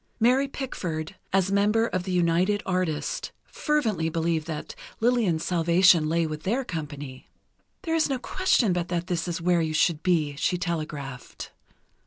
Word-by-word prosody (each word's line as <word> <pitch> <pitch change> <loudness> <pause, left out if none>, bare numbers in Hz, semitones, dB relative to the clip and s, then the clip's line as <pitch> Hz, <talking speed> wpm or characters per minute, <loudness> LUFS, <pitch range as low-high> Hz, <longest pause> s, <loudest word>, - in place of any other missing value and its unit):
Mary 255 +4 +3
Pickford, 180 - -4 0.2
as 195 0 +2
member 210 +3 +3
of 185 -5 -2
the 190 - -3
United 180 +3 +2
Artists, 180 -5 -2
fervently 220 - 0
believed 165 -1 -1
that 155 -2 -5 0.3
Lillian's 220 -9 +1
salvation 170 -1 +4
lay 165 +1 +1
with 155 -1 -5
their 240 +9 -1
company. 145 - -7 0.5
"There 325 -3 -2
is 320 -2 +2
no 270 - 0
question 250 - +1
but 175 -1 -1
this 175 0 -2
is 170 -1 -2
where 175 -1 +3
you 155 -1 -1
should 155 0 +2
be," 155 -5 +1
she 180 - +1
telegraphed. 155 -7 -5
175 Hz, 150 wpm, -26 LUFS, 160-205 Hz, 0.5 s, salvation